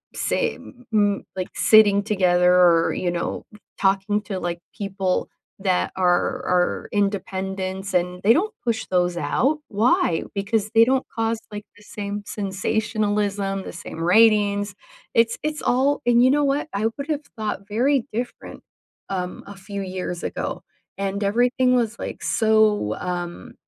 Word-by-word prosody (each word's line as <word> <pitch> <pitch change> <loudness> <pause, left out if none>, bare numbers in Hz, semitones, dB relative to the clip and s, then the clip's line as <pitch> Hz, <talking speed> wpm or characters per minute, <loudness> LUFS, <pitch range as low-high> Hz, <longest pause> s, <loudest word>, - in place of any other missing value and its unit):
say, - - 0
m 245 -1 -15
m 205 -2 +2
like, 185 -1 -4
sitting 205 -2 +5
together, 180 -4 +3
or, 175 -2 +4
you 175 - -1
know, 170 0 -3 0.3
talking 195 +1 +1
to, 195 -3 -4
like, 175 -1 -3 0.2
people 195 -3 -1 0.3
that 190 -2 0
are 185 -1 +2 0.4
are 180 -7 +1
independents, 190 -1 -2
and 180 0 0
they 210 - +6
don't 420 - 0
push 230 -2 -1
those 180 -1 +1
out, 275 - +1
why? 205 -6 +2
Because 200 +1 -1
they 225 0 +7
don't 260 +2 +1
cause, 225 -2 -1
like, 210 0 -7
the 205 - -18
same 205 0 -5
sensationalism, 205 0 -1
the - - -8
same 165 -1 -8
ratings. 205 +1 +4 0.4
It's 230 0 +3
it's 305 0 -2
all 275 +4 +2
and, 240 0 +5
you 255 - +6
know 295 +1 +2
what? 280 +2 0
I 200 +2 -1
would 280 0 -5
have 300 -1 -1
thought 210 -2 -4
very 245 +5 +1
different, 240 +2 -5 0.5
um, 180 -2 -4
a 200 - -9
few 200 +1 -6
years 185 -2 -5
ago, - - -4 0.4
and 195 +1 -2
everything 245 +4 +2
was, 235 -2 0
like, - - -6
so, 215 - +2
um, 180 +6 -5
205 Hz, 150 wpm, -23 LUFS, 190-225 Hz, 0.5 s, they